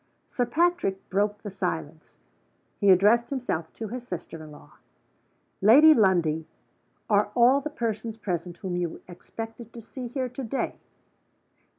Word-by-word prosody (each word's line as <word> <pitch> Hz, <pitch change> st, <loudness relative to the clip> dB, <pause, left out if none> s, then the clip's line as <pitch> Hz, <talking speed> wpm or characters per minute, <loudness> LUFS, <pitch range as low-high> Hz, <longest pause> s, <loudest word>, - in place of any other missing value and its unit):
Sir 245 Hz, -2 st, -2 dB
Patrick 330 Hz, -, 0 dB
broke 205 Hz, +2 st, 0 dB
the 205 Hz, -, -6 dB
silence. 160 Hz, -4 st, -5 dB, 0.6 s
He 200 Hz, -, +3 dB
addressed 210 Hz, +6 st, +5 dB
himself 235 Hz, -, -3 dB
to 220 Hz, -2 st, -6 dB
his 245 Hz, +1 st, -6 dB
sister 165 Hz, -2 st, -7 dB
in 155 Hz, -, -11 dB
law. 150 Hz, -1 st, -16 dB, 0.8 s
"Lady 285 Hz, +10 st, +8 dB
Lundie, 170 Hz, -, +2 dB, 0.6 s
are 205 Hz, -1 st, +3 dB
all 250 Hz, +3 st, +5 dB
the 305 Hz, -, -4 dB
persons 230 Hz, -5 st, -3 dB
present 175 Hz, -4 st, -4 dB
whom 185 Hz, -3 st, -4 dB
you 175 Hz, -2 st, -3 dB
expected 225 Hz, +6 st, -9 dB
to 235 Hz, -, -9 dB
see 245 Hz, +3 st, -8 dB
here 255 Hz, +1 st, -3 dB
to 250 Hz, +2 st, -7 dB
day?" 255 Hz, +3 st, -3 dB
210 Hz, 145 wpm, -26 LUFS, 180-245 Hz, 0.8 s, Lady